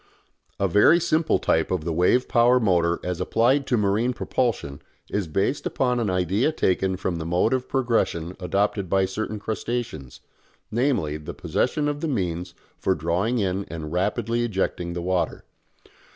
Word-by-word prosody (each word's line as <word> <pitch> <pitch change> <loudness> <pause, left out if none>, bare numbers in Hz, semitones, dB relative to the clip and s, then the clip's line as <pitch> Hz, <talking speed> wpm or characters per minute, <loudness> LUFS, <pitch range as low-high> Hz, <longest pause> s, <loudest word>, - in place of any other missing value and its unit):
A 100 - +2
very 105 - +5
simple 160 -1 +2
type 80 0 +1
of 90 -4 -2
the 85 - -1
wave 90 +10 +3
power 120 +1 +4
motor 85 -6 +2
as 90 0 -3
applied 125 +8 +2
to 125 - +2
marine 105 +4 +1
propulsion 115 - -2 0.3
is 100 -4 -1
based 100 - -1
upon 125 -2 0
an 110 -4 0
idea 95 - +1
taken 95 - 0
from 90 -2 -2
the 80 - -4
mode 90 +8 +1
of 130 -1 -2
progression 115 -9 0
adopted 100 +1 0
by 95 +1 +3
certain 110 +3 -4
crustaceans, 105 - -4 0.5
namely 115 - 0
the 75 - -8
possession 150 -1 0
of 145 0 -2
the 165 - -1
means 90 - -2 0.2
for 95 - +1
drawing 90 +10 0
in 95 -2 0
and 80 -2 -7
rapidly 105 +5 0
ejecting 95 -5 -2
the 85 -1 -4
water. 90 0 -1
100 Hz, 160 wpm, -24 LUFS, 90-120 Hz, 0.5 s, very